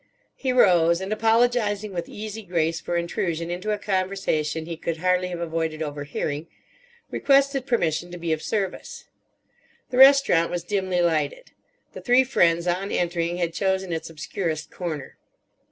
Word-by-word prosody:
He 265 - -2
rose 175 -8 +4
and, 190 +2 -3
apologising 220 -2 +1
with 170 -1 -4
easy 215 +1 -6
grace 165 -4 -1
for 175 - -2
intrusion 170 0 -2
into 180 +4 -4
a 210 - +1
conversation 185 -6 -1
he 165 0 -5
could 165 0 -4
hardly 180 +1 +1
have 175 -1 -5
avoided 160 -1 -2
overhearing, 145 +1 -4 0.6
requested 275 -1 +2
permission 175 - 0
to 175 - -8
be 170 -2 -1
of 155 - -3
service. 200 -4 -4 0.9
The 250 - -2
restaurant 270 -11 +6
was 175 -1 -3
dimly 185 -1 0
lighted; 175 - -1 0.4
the - - -8
three 250 +1 +4
friends 170 -9 +2
on 180 +3 -1
entering 175 0 -1
had 170 -2 -1
chosen 190 -1 -1
its 160 0 -4
obscurest 160 0 -4
corner. 155 -6 -6
175 Hz, 150 wpm, -24 LUFS, 165-205 Hz, 0.9 s, restaurant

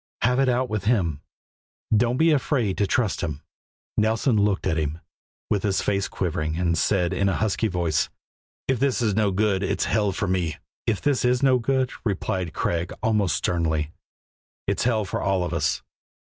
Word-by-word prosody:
Have 125 +2 +3
it 135 -1 +3
out 125 +1 +1
with 105 -3 -3
Him. 85 - +1 0.7
Don't 120 +3 +2
be 160 +2 +4
afraid 130 -8 +1
to 100 - +2
trust 110 -2 0
Him." 75 -5 -4 0.5
Nelson 110 +3 +2
looked 105 -2 +1
at 90 -4 +1
him, 75 +1 -2 0.5
with 100 - +1
his 100 -1 +1
face 100 -1 0
quivering, 80 -3 -2
and 85 -1 +1
said 90 +1 +1
in 100 +1 +1
a 95 - 0
husky 110 +2 0
voice: 85 -5 0 0.6
"If 130 -3 +1
this 130 -2 +1
is 105 -3 +2
no 105 0 +2
good, 100 0 +1
it's 95 - 0
hell 105 -3 +1
for 100 +2 -2
me." 90 -4 -1 0.3
"If 110 -4 0
it 145 -3 +2
is 125 +1 +2
no 130 -2 +5
good," 130 +1 0
replied 95 -4 -1
Craig 85 +4 -1
almost 105 -7 +2
sternly, 80 -3 0 0.7
"it's - - 0
hell 110 -4 +2
for - - -3
all 95 -2 +1
of 90 - -3
us." 80 -1 0
100 Hz, 180 wpm, -24 LUFS, 90-115 Hz, 0.7 s, no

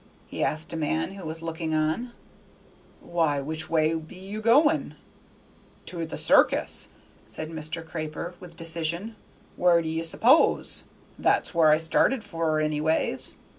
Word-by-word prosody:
he - - -4
asked 155 +2 -2
a - - -3
man 160 +3 -1
who 195 -1 -9
was 160 +1 -6
looking 165 -1 -3
on. 155 +11 0 0.9
"Why, 165 -4 0
which 155 +3 -5
way 160 -1 +2
be 160 +2 -6
ye 195 +3 -7
goin'?" 290 +8 +3 0.9
"To 170 -2 -5
the - - -5
circus," - - +3 0.4
said 155 +1 -5
Mr. 160 +1 -5
Craper, 160 +2 -5
with 175 -2 -12
decision, 170 +6 -2 0.4
"where 175 -1 +5
d'ye 160 0 -2
s'pose? 235 - +3 0.3
That's - - +1
where 165 -2 +5
I 155 - +6
started 185 +9 +1
for, 165 -5 -1
anyways." 155 +1 0
165 Hz, 135 wpm, -26 LUFS, 155-180 Hz, 0.9 s, I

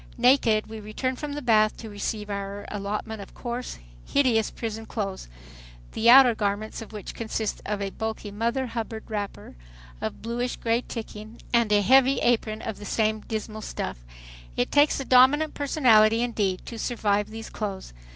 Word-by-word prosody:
Naked, 240 -3 +4
we 220 0 -8
return 215 +5 -3
from 295 +2 -5
the 295 0 -5
bath 215 -3 +3
to 225 - -8
receive 210 0 -4
our 200 0 -5
allotment 210 +1 -4
of 195 - -12
coarse, 245 0 -5 0.3
hideous 245 -6 +2
prison 225 -1 -6
clothes, 195 - -4 0.6
the 230 - +2
outer 255 -1 +9
garments 210 +1 -2
of 225 - -10
which 210 -2 -7
consist 220 -1 -3
of 205 -1 -2
a 195 - -3
bulky 220 -1 -5
mother 235 +5 -1
hubbard 225 -2 -5
wrapper, 205 - -5 0.5
of 110 - -5
bluish 240 +2 -2
gray 230 +1 0
ticking 220 -2 -8
and 235 -3 +3
a 205 -1 +4
heavy 265 +4 +5
apron 220 -2 +1
of 220 - -5
the 205 - -8
same 215 +1 +1
dismal 215 0 -5
stuff. - - -5 0.5
It 125 - 0
takes 290 0 +4
a 275 - -4
dominant 265 +5 +5
personality 230 -6 +4
indeed 205 -6 -1
to 230 - -7
survive 210 -4 0
these 225 +1 -8
clothes. 195 - -5
220 Hz, 165 wpm, -26 LUFS, 210-240 Hz, 0.6 s, outer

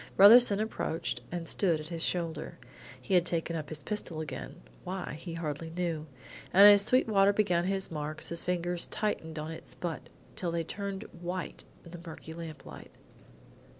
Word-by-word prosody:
Brotherson 210 0 +8
approached 215 -6 -2
and 170 -1 -4
stood 170 -4 +2
at 155 +1 -7
his 165 -1 -3
shoulder. 170 -3 -2 0.4
He 195 - -4
had 180 -2 +6
taken 170 -1 -1
up 155 -2 -4
his 155 -1 -7
pistol 210 -6 -4
again, 135 - -7 0.2
why 185 0 -4
he 165 0 -7
hardly 160 -1 -4
knew, 165 -2 -3 0.4
and 200 +2 +8
as 205 -1 +9
Sweetwater 205 -4 +4
began 180 -5 +2
his 190 -1 -2
marks, 155 0 -4
his 170 0 -2
fingers 175 -1 0
tightened 165 -7 -3
on 155 +1 -4
its 160 - -10
butt 170 -3 -5 0.3
till 175 - -2
they 165 0 -1
turned 200 +3 -5 0.2
white 175 -1 -5 0.2
in 170 - -12
the 175 -1 -9
murky 160 -1 -9
lamplight. 160 -4 -9
170 Hz, 165 wpm, -30 LUFS, 160-195 Hz, 0.4 s, as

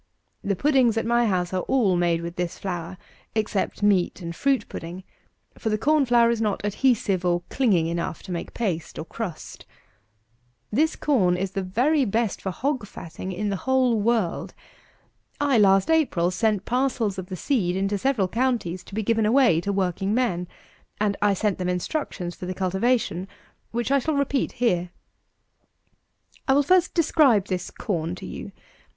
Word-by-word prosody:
The 200 -1 0
puddings 260 -2 +3
at 225 - 0
my 235 0 +3
house 180 -2 0
are 185 - 0
all 225 -9 +3
made 170 -1 +1
with 170 0 -6
this 175 -1 -3
flour, 180 -1 -5 0.4
except 215 -2 -1
meat 195 -4 +2
and 170 -2 -6
fruit 275 +4 +1
pudding; 175 +3 -7 0.6
for 220 - -1
the 215 - +1
corn 290 +4 +2
flour 235 -1 +5
is 230 -1 -1
not 210 -2 -1
adhesive 205 -4 +1
or 175 -1 +1
clinging 205 -11 +2
enough 170 0 -3
to 190 - -8
make 170 -1 -5
paste, 180 -9 -3
or 160 - -5
crust. 185 -5 -7 1.1
This 310 +9 +2
corn 190 -12 +2
is 190 +1 -2
the 195 - -2
very 255 +11 +2
best 225 -1 -1
for 195 - -3
hog 255 +2 -2
fatting 180 +1 -7
in 205 +3 -2
the 200 - -1
whole 255 -4 +3
world. 220 -5 0 0.8
I, 280 -5 +3
last 195 +5 +4
April, 205 - +2
sent 205 +1 0
parcels 245 -6 0
of 185 - -6
the 185 - -5
seed 185 - 0
into 195 +1 0
several 240 -5 +1
counties, 225 -5 -1
to 195 - -10
be 220 - -1
given 225 0 +2
away 235 -8 +4
to 200 - -2
working 195 +1 0
men: 180 -9 0 0.5
and 205 -1 +1
I 205 -1 +3
sent 205 0 -1
them 180 0 -1
instructions 180 - -3
for 180 - -8
the 185 - -4
cultivation, 190 0 0 0.4
which 240 +3 -2
I 280 - +4
shall 310 +3 -1
repeat 280 -1 0
here. 180 -8 0 1.5
259. - - -37
I 265 - +4
will 285 - +4
first 365 +4 +3
describe 290 - +4
this 185 -2 -2
corn 175 -6 -3
to - - -9
you. 200 - -7
205 Hz, 175 wpm, -24 LUFS, 180-245 Hz, 1.5 s, flour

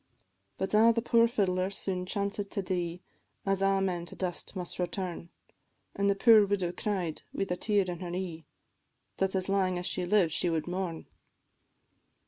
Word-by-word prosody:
But 190 - -3
ah! 225 +2 +7
the 230 0 -1
poor 230 -1 +5
fiddler 185 -5 0
soon 185 -2 -2
chancéd 200 +1 -2
to 200 - -2
die, 175 -1 -2 0.4
As 195 -1 +1
a' 195 0 +3
men 175 -3 -1
to - - -7
dust 180 +1 -4
must 180 -1 -5
return; 175 -1 -3 0.7
An' 200 0 +1
the 200 - +3
poor 220 +1 +7
widow 190 -3 0
cried, 180 -4 -2
wi' - - -1
the 180 - -2
tear 205 0 +1
in 175 -2 -4
her 180 -1 -5
e'e, 175 -3 -5 0.7
That 195 0 0
as 185 -1 0
lang 190 -2 +1
as 175 - -4
she 180 - -1
lived 185 -4 +3
she 175 - +1
wad 160 -2 -1
mourn. 175 -2 -4
190 Hz, 175 wpm, -30 LUFS, 175-200 Hz, 0.7 s, ah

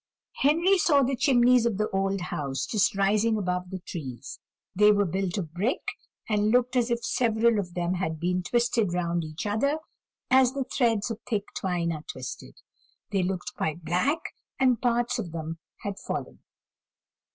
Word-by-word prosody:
Henry 335 +7 +3
saw 285 -5 +4
the 265 +1 +1
chimneys 245 -2 +4
of 220 -5 -1
the 215 +1 +1
old 195 0 0
house 140 -6 -3
just 210 0 +1
rising 210 +3 +2
above 180 -2 -2
the 190 - -4
trees; 135 -7 -7 0.4
they 210 +2 +6
were 205 -1 +3
built 190 +1 -2
of 165 -5 -4
brick, 205 +10 -1 0.4
and 210 -1 +2
looked 250 +2 +2
as 245 -1 +2
if 235 0 -1
several 230 -2 +2
of 175 -3 -5
them 175 0 0
had 160 -4 -2
been 180 +2 0
twisted 230 -2 +1
round 170 -1 0
each 155 +3 -6
other, 235 +9 +1 0.5
as 260 -1 +5
the 275 -1 -1
threads 235 -4 0
of 225 - -5
thick 210 -4 0
twine 175 -3 -1
are 155 -2 -4
twisted; 130 -1 -8 0.6
they 195 -2 +1
looked 185 0 -3
quite 160 +1 -3
black, 215 - +2 0.4
and 255 -4 +3
parts 240 0 +1
of 175 -7 -5
them 165 0 -5 0.2
had 200 -1 -4
fallen. - - -5
205 Hz, 170 wpm, -27 LUFS, 175-240 Hz, 0.6 s, they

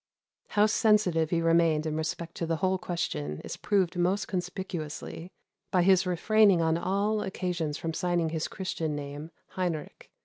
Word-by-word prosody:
How 210 0 +3
sensitive 210 -7 +3
he 165 -1 +1
remained 165 -2 +3
in 155 -1 -2
respect 160 +1 -3
to 165 - -2
the 165 - +1
whole 185 +2 0
question 75 - -3
is - - -5
proved 190 -4 +1
most 180 +3 +1
conspicuously 180 -2 -5 0.4
by 180 -2 +3
his 190 0 +4
refraining 200 +1 +4
on 160 -1 +2
all 200 +5 0
occasions 175 -6 -2
from 165 -1 -3
signing 175 -1 0
his 160 0 -2
Christian 165 -5 -3
name, 145 +2 -6 0.2
Heinrich. 175 -5 -4
175 Hz, 150 wpm, -28 LUFS, 160-190 Hz, 0.4 s, his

